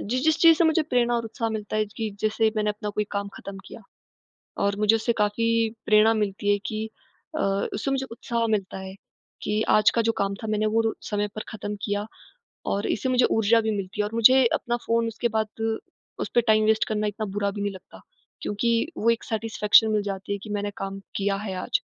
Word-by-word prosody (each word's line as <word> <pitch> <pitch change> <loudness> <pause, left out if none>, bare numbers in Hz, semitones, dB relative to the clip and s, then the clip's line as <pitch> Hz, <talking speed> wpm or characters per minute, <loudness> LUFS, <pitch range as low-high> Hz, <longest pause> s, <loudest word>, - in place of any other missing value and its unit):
जिस-जिस 260 +8 +1
चीज़ 330 -1 +7
से 340 - +4
मुझे 320 0 +3
प्रेरणा 240 -1 +2
और 230 - -2
उत्साह 225 +1 -3
मिलता 210 0 -4
है 215 0 +1
च 205 - -18
कि 220 -2 -2
जैसे, 220 +1 +2
मैंने 210 0 +1
अपना 210 0 -5
कोई 210 +1 -1
काम 200 -1 -2
खत्म 200 -1 -8
किया - - -11 0.8
और 200 0 +1
मुझे 215 +2 +5
उससे 230 +2 0
काफ़ी 225 +2 +2 0.2
प्रेरणा 215 +1 +5
मिलती 205 0 0
है 205 - +2
कि 215 0 -3 0.5
अ, - - -2 0.3
उससे 215 +6 -2
मुझे 270 -1 -1
उत्साह 235 0 -2
मिलता 195 -1 -7
है 190 0 -8 0.5
कि 210 +1 0
आज 210 - +5
का 230 - +4
जो 225 - +4
काम 200 0 0
था - - -3
मैंने 215 0 +1
वो 225 - +4
रो 225 -1 0 0.2
समय 205 0 0
पर 215 - -4
खत्म 210 -1 -5
किया 205 0 -1 0.7
और 200 +1 -1
इससे 260 - -1
मुझे 255 -1 +3
ऊर्जा 225 +1 +4
भी 220 - -1
मिलती 195 0 -5
है 210 - +3
और 215 - -7
मुझे 255 +3 +6
अपना 240 0 -1
फ़ोन 230 0 +2
उसके 230 +1 -1
बाद, 215 -1 +1 0.7
उसपे 240 - +2
टाइम 215 -1 +3
वेस्ट 220 0 +3
करना 215 -1 -1
इतना 210 +1 -3
बुरा 200 -1 +1
भी 205 +1 -6
नहीं 205 0 -1
लगता 190 - -13 0.4
क्योंकि, 230 +6 0
वो 230 - +3
एक 230 - -1
सैटिस्फैक्शन 220 0 +3
मिल 210 -1 +1
जाती 195 0 -4
है 200 - -2
कि 215 - -8
मैंने 205 0 -2
काम 195 0 -5 0.2
किया 200 0 0
है 190 - -3
आज। - - +1
215 Hz, 220 wpm, -25 LUFS, 205-230 Hz, 0.8 s, चीज़